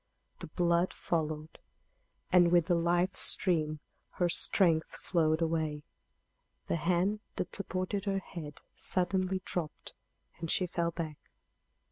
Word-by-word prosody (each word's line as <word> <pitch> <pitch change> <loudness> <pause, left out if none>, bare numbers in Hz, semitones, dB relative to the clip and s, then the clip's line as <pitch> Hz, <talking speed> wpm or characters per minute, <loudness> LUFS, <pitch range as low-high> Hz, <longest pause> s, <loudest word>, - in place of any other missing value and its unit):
The - - -7
blood 170 +2 +1
followed, 155 -2 -3 0.7
and 175 -1 +5
with 175 -2 +4
the 175 - +2
life 175 +2 +1
stream 155 -5 +2 0.3
her 175 -1 +1
strength 165 -2 +4
flowed 160 -2 +1
away. 160 -2 -1 0.8
The - - -1
hand 180 +5 +1 0.2
that 180 - -3
supported 195 +1 -3
her 195 -1 0
head 160 -6 -8
suddenly 185 0 -1
dropped, 160 -4 -4 0.5
and 165 -1 -5
she 185 - +2
fell 170 -1 -1
back. 160 -3 -5
170 Hz, 120 wpm, -31 LUFS, 160-185 Hz, 0.8 s, and